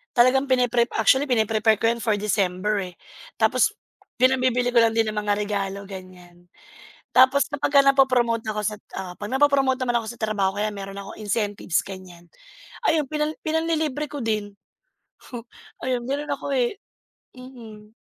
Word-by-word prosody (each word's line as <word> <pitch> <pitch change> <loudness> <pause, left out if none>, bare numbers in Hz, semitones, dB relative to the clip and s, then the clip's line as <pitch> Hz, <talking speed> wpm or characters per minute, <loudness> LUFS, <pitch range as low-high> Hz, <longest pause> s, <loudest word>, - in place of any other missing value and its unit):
talagang 255 +3 +4
pine-prep 245 -2 +2
actually 270 +1 +4
pine-prepare 220 -1 +2
ko 225 - +2
yan 235 - -4
for 220 -3 +2
December 195 -1 -1
eh. - - -31 0.4
Tapos 255 - +3 0.5
pinang-bibili 255 -1 +2
ko 240 - +4
lang 225 -1 +2
din 225 -1 +2
ng 210 - -8
mga 210 -1 +1
regalo 200 -1 -3
ganyan. 180 -2 -12 0.6
Tapos 260 +2 +5
kapagka 285 0 +3
na-po-promote 250 -4 +3
ako 210 0 -2
sa 210 +1 -1
oo 185 -2 -8
pag 205 - -5
na-po-promote 270 -1 +3
naman 240 -1 +1
ako - - -9
sa - - -25
trabaho 200 -3 0
kaya 210 +1 0
meron 195 -1 -7
akong 200 +2 -9
incentives 205 -4 -1
ganyan, 185 -3 -11 0.6
ayun, 315 -2 +3
pinang 305 0 -1
pinang-lilibre 315 -2 -1
ko 290 - -6
din. 210 -2 -2 0.8
Hmm. 240 -2 -6 0.4
Ayun 250 -2 -1
meron 290 +2 -3
ako 280 0 -3
eh. 255 +9 0 0.6
Mm. 225 -5 -12
230 Hz, 155 wpm, -23 LUFS, 205-265 Hz, 0.8 s, Tapos